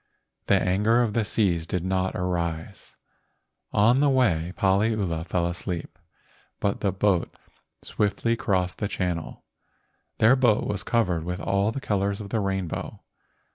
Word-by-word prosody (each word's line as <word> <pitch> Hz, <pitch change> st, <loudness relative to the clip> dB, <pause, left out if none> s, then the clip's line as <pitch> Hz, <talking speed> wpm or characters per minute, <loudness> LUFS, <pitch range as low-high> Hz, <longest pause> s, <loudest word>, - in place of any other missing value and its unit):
The -, -, +4 dB
anger 105 Hz, +6 st, +2 dB
of 110 Hz, -3 st, -1 dB
the 115 Hz, -, +1 dB
seas 90 Hz, -6 st, 0 dB
did 90 Hz, 0 st, -2 dB
not 95 Hz, 0 st, 0 dB
arise. 85 Hz, -3 st, -3 dB, 0.8 s
On 115 Hz, +5 st, +4 dB
the 145 Hz, 0 st, +4 dB
way 90 Hz, -11 st, +2 dB
Paliula 100 Hz, -4 st, +1 dB
fell 85 Hz, 0 st, 0 dB
asleep, 85 Hz, 0 st, -5 dB, 0.6 s
but 100 Hz, -, -1 dB
the 100 Hz, -, 0 dB
boat 95 Hz, -1 st, +1 dB, 0.5 s
swiftly 110 Hz, +3 st, 0 dB
crossed 90 Hz, -5 st, -1 dB
the 105 Hz, -, -1 dB
channel. 90 Hz, -4 st, -3 dB, 0.7 s
Their 115 Hz, +4 st, +5 dB
boat 120 Hz, -5 st, +3 dB
was 100 Hz, -1 st, -2 dB
covered 90 Hz, -8 st, 0 dB
with 90 Hz, +2 st, -4 dB
all 100 Hz, +1 st, +1 dB
the 135 Hz, -, -4 dB
colors 100 Hz, -4 st, -1 dB
of 100 Hz, -2 st, -7 dB
the 110 Hz, -, 0 dB
rainbow. 95 Hz, -4 st, -3 dB
100 Hz, 140 wpm, -25 LUFS, 90-110 Hz, 0.8 s, Their